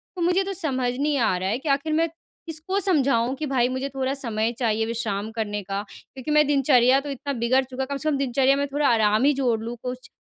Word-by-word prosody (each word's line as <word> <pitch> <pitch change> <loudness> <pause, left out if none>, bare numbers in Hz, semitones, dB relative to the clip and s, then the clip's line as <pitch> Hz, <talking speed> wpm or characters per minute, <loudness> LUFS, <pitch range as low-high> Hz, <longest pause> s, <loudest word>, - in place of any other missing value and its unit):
तो 360 - -5
मुझे 360 +3 +2
तो 390 +1 -4
समझ 265 -9 -1
नहीं 290 +1 +1
आ 230 -7 +2
रहा 185 +1 -2
है 220 - 0
कि 295 +2 -4
आख़िर 280 +3 +1
मैं 325 +2 +2 0.4
किसको 330 +4 -3
समझाऊँ 275 - +1
कि 305 +3 -4
भाई, 255 -3 +1
मुझे 260 +2 -3
थोड़ा 265 0 -2
समय 230 -5 -1
चाहिए 225 -2 +1
विश्राम 220 -2 -3
करने 210 -2 -3
का 195 +1 -3
क्योंकि 270 +3 -8
मेरा 300 -1 +4
दिनचर्या 270 -2 +4
तो 290 +1 -7
इतना 280 +1 -4
बिगड़ 250 +2 +2
चुका, 260 +1 -4
कम 280 +1 -4
से 310 +3 -1
कम 290 - +1
दिनचर्या 270 0 +2
में 285 +1 -1
थोड़ा 290 0 +2
आराम 215 0 +3
ही 290 - +5
जोड़ 250 -5 0
लूँ 235 +1 -5
कुछ। 255 0 -6
265 Hz, 235 wpm, -24 LUFS, 235-290 Hz, 0.4 s, ही